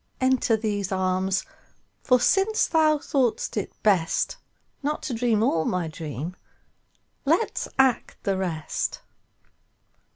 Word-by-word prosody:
Enter 260 -3 +2
these 205 -3 -2
arms, 185 0 0 0.6
for 250 -2 +4
since 390 - +3
thou 310 -2 +3
thought'st 265 -5 0
it 210 - -2
bestNot 210 - -1
to 265 - -3
dream 225 -2 +1
all 165 -8 +2
my 180 -1 -1
dream, 155 +1 -6 0.9
let's 330 +10 +1
act 265 -3 +2
the 195 - +1
rest. 170 -5 -3
215 Hz, 105 wpm, -25 LUFS, 185-265 Hz, 0.9 s, for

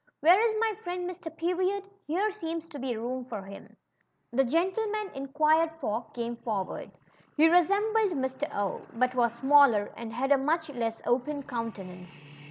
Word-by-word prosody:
" - - -53
Where 350 +5 +7
is 445 -1 +2
my 445 -1 +1
friend 355 0 -3
Mr. 360 -2 -6
Period? 370 +4 0 0.2
Here 385 +8 +1
seems 330 -4 -5
to 295 -4 -8
be 250 -3 -2
room 250 +3 -3
for 220 -6 -6
hiili.'' 195 +1 -12 0.6
The 270 +3 +4
gentleman 385 - 0
inquired 305 +4 +2
for 225 -3 -2
came 235 0 -3
forward. 210 -5 -4 0.5
He 315 +2 +7
resem 395 +6 +3
bled 420 -7 +2
Mr. 265 +2 -2
0^ 200 -1 -2
but 250 +2 +1
Avas 235 -2 0
smaller, 265 -6 +5
and 230 -1 -7
had 260 +4 -1
a 280 - +6
much 320 +3 0
less 230 -3 -3
open 275 +4 0
countenance. 195 - -6
285 Hz, 170 wpm, -29 LUFS, 235-355 Hz, 0.6 s, Where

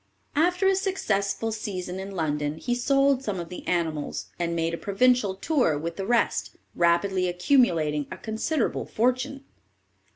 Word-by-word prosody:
After 360 +5 +3
a 385 - +4
successful 225 - -1
season 190 -4 -4
in 190 +1 -6
London, 150 -4 -2
he 245 +9 -2
sold 275 +2 +3
some 205 -8 -3
of 170 -1 -6
the 180 - -8
animals, 160 -4 -2
and 170 -1 -1
made 165 0 0
a - - -2
provincial 205 0 +2
tour 245 - +1
with 165 +3 -4
the 195 -1 -4
rest, 240 0 +1 0.2
rapidly 180 +2 +2
accumulating 170 - +2
a - - -7
considerable 225 +5 -1
fortune." 255 +4 0
200 Hz, 150 wpm, -26 LUFS, 170-255 Hz, 0.2 s, a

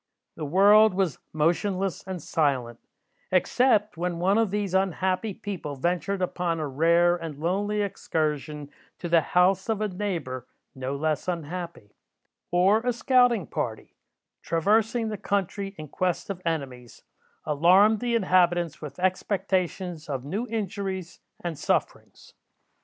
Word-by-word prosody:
The 155 - -5
world 205 +5 +6
was 185 -8 0
motionless 180 +4 0
and 190 -1 -4
silent, 130 -7 0 0.5
except 210 +1 +2
when 175 0 -2
one 190 +5 +2
of 225 -2 +2
these 200 -1 -2
unhappy 190 +2 0
people 185 -7 -6
ventured 180 +6 -1
upon 175 -2 -1
a 155 - -2
rare 170 +5 +3
and 165 -4 -7
lonely 205 +6 0
excursion 150 -6 -3 0.3
to 175 - -5
the 170 -1 +4
house 180 +6 +2
of 220 -2 0
a 215 - 0
neighbour 170 - -4 0.3
no 130 +1 -4
less 155 +3 -1
unhappy, 170 - -5 0.6
or 185 +5 +4
a 245 +1 -1
scouting 245 - +3
party, 110 -5 -4 0.5
traversing 220 +7 +1
the 210 - -4
country 195 0 -2
in 155 - -7
quest 180 +5 -2
of 185 -2 -7
enemies, 130 -7 -4 0.4
alarmed 185 +8 +5
the 240 0 0
inhabitants 175 -5 +2
with 145 -3 -8
expectations 185 -3 -1
of 135 -2 -3
new 205 - -3
injuries 195 -5 -4 0.2
and 170 -4 -4
sufferings. - - -2
180 Hz, 130 wpm, -26 LUFS, 155-200 Hz, 0.6 s, world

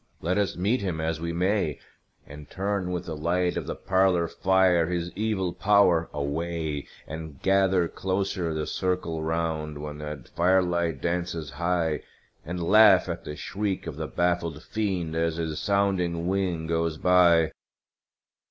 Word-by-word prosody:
Let 90 +5 0
us 100 -3 -1
meet 100 +7 +1
him 90 -5 -2
as 80 0 -2
we 85 0 -2
may, 90 -2 0 0.5
And 75 0 -11
turn 100 -1 -2
with 90 0 -3
the 80 -2 -5
light 90 +3 0
of - - -4
the - - -3
parlor 95 -2 +2
fire 90 -1 +3
his 90 0 -2
evil 100 -4 -1
power 100 -5 +3
away; 75 0 -3 0.2
And 80 -2 -8
gather 95 -2 +3
closer 95 -2 -2
the 80 -1 -2
circle 90 -3 -2
round, 80 -2 -2
when 75 0 -7
that 75 -1 -7
fire 95 +2 +3
light 85 -5 -1
dances 85 -4 -2
high, 85 0 0 0.4
And 90 +1 -4
laugh 100 0 +6
at 85 - -5
the 75 - -5
shriek 100 +3 -3
of 80 -4 -5
the 80 0 -4
baffled 85 -3 -1
Fiend 95 -7 -2
as 80 0 0
his 80 -2 -3
sounding 95 -4 0
wing 90 -4 -1
goes 80 -1 -1
by! 85 -2 +4
85 Hz, 150 wpm, -26 LUFS, 80-95 Hz, 0.5 s, laugh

